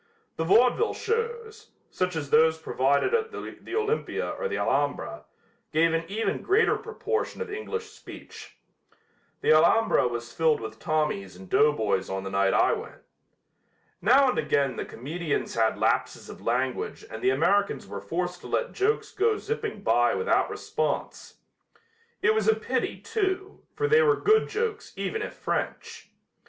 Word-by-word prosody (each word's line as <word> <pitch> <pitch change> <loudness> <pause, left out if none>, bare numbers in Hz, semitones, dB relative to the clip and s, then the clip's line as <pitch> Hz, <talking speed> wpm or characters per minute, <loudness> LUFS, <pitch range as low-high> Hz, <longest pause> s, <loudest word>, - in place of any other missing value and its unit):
The 160 - -2
vaudeville 245 - +3
shows, 455 -1 -3 0.2
such 180 -1 -1
as 145 -3 -4
those 160 +1 +5
provided 140 - +1
at 455 -1 +1
the 365 - -7
Olympia 440 +1 -1
or - - -3
the - - -3
Alhambra, - - -1 0.5
gave 165 +1 +3
an 165 0 0
even 215 +4 -2
greater 420 +4 +3
proportion 450 0 -3
of 465 -2 -5
English 440 +1 -5
speech. 450 - -12 0.8
The - - +5
Alhambra 165 - +4
was 120 0 -5
filled 160 -2 +2
with 110 0 -8
Tommies 150 - -1
and 95 0 -12
doughboys 105 -9 +2
on 95 0 -3
the 95 - -5
night 100 0 +2
I - - +4
went. - - -7 1.0
Now 260 +8 +5
and - - 0
again 140 -2 +1
the - - -4
comedians 150 +5 -3
had 110 -1 +1
lapses - - 0
of - - -12
language 125 +2 -2
and 110 - -8
the - - +3
Americans 175 +9 +1
were 100 0 -7
forced 180 - -3
to - - -9
let - - -1
jokes 425 +2 0
go 430 +2 +1
zipping 450 +2 -4
by - - +3
without 455 - +1
response. - - -3 0.9
It 440 - +5
was 440 - 0
a 445 - +5
pity, - - -2
too, 390 -2 -2
for 440 - 0
they 450 +1 +5
were 450 -2 +4
good 440 +1 +3
jokes 445 0 -3
even 440 - -3
if - - -5
French. 460 0 -4
185 Hz, 155 wpm, -26 LUFS, -, 1.0 s, those